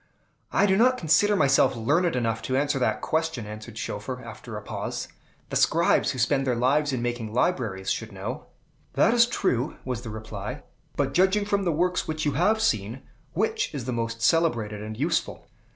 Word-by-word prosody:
"I 200 Hz, -, +3 dB
do 190 Hz, -1 st, +3 dB
not 255 Hz, +3 st, +4 dB
consider 180 Hz, +5 st, +3 dB
myself 140 Hz, -7 st, +4 dB
learned 150 Hz, +9 st, +1 dB
enough 115 Hz, -2 st, -1 dB
to 130 Hz, -, +1 dB
answer 145 Hz, 0 st, +1 dB
that 125 Hz, -, 0 dB
question," 160 Hz, -7 st, -1 dB
answered 110 Hz, +1 st, -9 dB
Schoeffer, 110 Hz, +4 st, -4 dB
after -, -, -8 dB
a -, -, -6 dB
pause. -, -, -4 dB, 0.4 s
"The -, -, -3 dB
scribes -, -, +3 dB
who -, -, -3 dB
spend 135 Hz, +2 st, +1 dB
their 125 Hz, -, +2 dB
lives 140 Hz, +5 st, +2 dB
in 125 Hz, -2 st, -2 dB
making 120 Hz, -2 st, -3 dB
libraries 115 Hz, -, 0 dB
should 110 Hz, -1 st, -3 dB
know." 95 Hz, -1 st, -6 dB, 0.5 s
"That 225 Hz, -, +4 dB
is 235 Hz, -1 st, +5 dB
true," 155 Hz, -, 0 dB
was 125 Hz, -3 st, -3 dB
the 120 Hz, -, -7 dB
reply. 110 Hz, +4 st, -6 dB, 0.3 s
"But, 135 Hz, -2 st, 0 dB
judging 190 Hz, +4 st, +3 dB
from 200 Hz, -1 st, 0 dB
the 175 Hz, -, +2 dB
works 180 Hz, +3 st, 0 dB
which 155 Hz, 0 st, -2 dB
you 145 Hz, -, +2 dB
have 180 Hz, +11 st, +2 dB
seen, 110 Hz, -, -1 dB, 0.3 s
which 445 Hz, -1 st, 0 dB
is 130 Hz, -5 st, -4 dB
the 125 Hz, -, -2 dB
most 115 Hz, -1 st, -3 dB
celebrated 115 Hz, -8 st, +2 dB
and 110 Hz, 0 st, -6 dB
useful?" 160 Hz, +6 st, -1 dB
130 Hz, 185 wpm, -26 LUFS, 115-170 Hz, 0.5 s, is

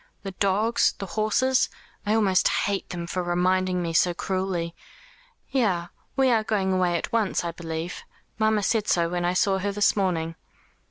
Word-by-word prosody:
The 195 Hz, -, -4 dB
dogs, 200 Hz, +4 st, +2 dB
the 195 Hz, -, -5 dB
horses. 220 Hz, +6 st, +1 dB, 0.4 s
I 215 Hz, -, +3 dB
almost 195 Hz, -4 st, +3 dB
hate 200 Hz, -1 st, -1 dB
them 175 Hz, -1 st, -4 dB
for 180 Hz, +2 st, -2 dB
reminding 180 Hz, +1 st, +1 dB
me 165 Hz, -1 st, -3 dB
so 175 Hz, +1 st, +3 dB
cruelly. 185 Hz, -3 st, -2 dB, 0.8 s
Yes, 185 Hz, -10 st, +1 dB, 0.3 s
we 265 Hz, -1 st, +3 dB
are 225 Hz, -2 st, +3 dB
going 195 Hz, -3 st, 0 dB
away 180 Hz, -2 st, +2 dB
at -, -, -5 dB
once, 220 Hz, -6 st, +1 dB
I 170 Hz, -, -2 dB
believe. 165 Hz, +1 st, -5 dB, 0.4 s
Mamma 220 Hz, -1 st, +2 dB
said 215 Hz, 0 st, +1 dB
so 170 Hz, -1 st, +2 dB
when 175 Hz, 0 st, -1 dB
I 175 Hz, -, +1 dB
saw 190 Hz, +1 st, +2 dB
her 200 Hz, +2 st, -1 dB
this 205 Hz, +1 st, +2 dB
morning." 170 Hz, -5 st, 0 dB
190 Hz, 170 wpm, -25 LUFS, 175-210 Hz, 0.8 s, I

